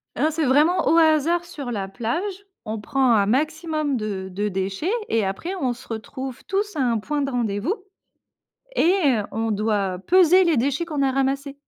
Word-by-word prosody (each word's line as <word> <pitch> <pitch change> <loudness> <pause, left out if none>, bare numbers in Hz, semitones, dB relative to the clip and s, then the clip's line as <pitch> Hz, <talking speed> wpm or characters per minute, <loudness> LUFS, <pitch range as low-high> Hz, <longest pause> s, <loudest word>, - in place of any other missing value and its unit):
Ah, 305 +7 +1
c'est 315 0 -1
vraiment 300 +7 +3
au 330 - +4
hasard 325 +2 +3
sur 285 -8 -6
la 195 -3 -3
plage, 235 - -2 0.4
on 215 0 -4
prend 265 +1 +1
un 205 -3 +4
maximum 310 +2 0
de 205 -5 -3
de 205 +3 -2
déchets 190 - -2 0.2
et 225 -1 +1
après 195 - -3
on 255 -2 +1
se 240 - -14
retrouve 255 +3 -6
tous 405 0 -2
à - - -3
un 240 -3 +2
point 290 +7 -2
de 275 - -1
rendez-vous. 235 - -1 1.0
Et 360 -5 +4 0.4
on 225 +1 -1
doit 205 -3 0
peser 370 +1 +6
les 335 -5 +2
déchets 280 +7 0
qu'on 295 -4 -2
a 265 -1 +2
ramassés. 275 +1 -1
270 Hz, 180 wpm, -23 LUFS, 220-315 Hz, 1.0 s, peser